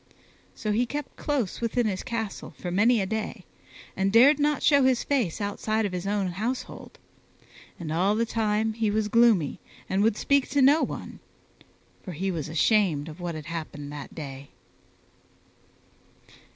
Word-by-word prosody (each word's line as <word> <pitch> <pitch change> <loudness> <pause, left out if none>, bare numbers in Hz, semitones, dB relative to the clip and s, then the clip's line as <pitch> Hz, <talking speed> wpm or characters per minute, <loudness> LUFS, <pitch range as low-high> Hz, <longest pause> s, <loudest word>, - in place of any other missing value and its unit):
So 215 - -3
he 235 +4 +1
kept 290 +2 -5
close 265 -11 -2
within 235 +1 0
his 195 -3 -1
castle 225 -5 -5
for 175 - -5
many 220 +5 +3
a - - 0
day 215 -1 -4 0.5
and 190 +1 +1
dared 265 +7 +6
not 295 0 +1
show 285 -2 +5
his 260 -2 +3
face 245 - 0
outside 215 +2 -1
of 200 - -2
his 180 +1 -4
own 200 -2 0
household, 220 +8 -5 0.8
and 160 -3 -5
all 190 +5 +2
the 230 +1 +1
time 220 -1 0
he 220 -1 0
was 210 0 0
gloomy 220 - +3 0.3
and 190 +1 0
would 215 0 +2
speak 280 -1 +2
to 285 - +2
no 290 +4 +6
one, - - -5 0.8
for 185 - -7
he 190 +5 -2
was 165 -3 -4
ashamed 165 -3 +2
of 155 +3 -11
what 175 -2 -4
had 155 -1 -7
happened 155 -3 -6
that 145 -2 -8
day. 140 -3 -8
210 Hz, 165 wpm, -26 LUFS, 175-235 Hz, 0.8 s, dared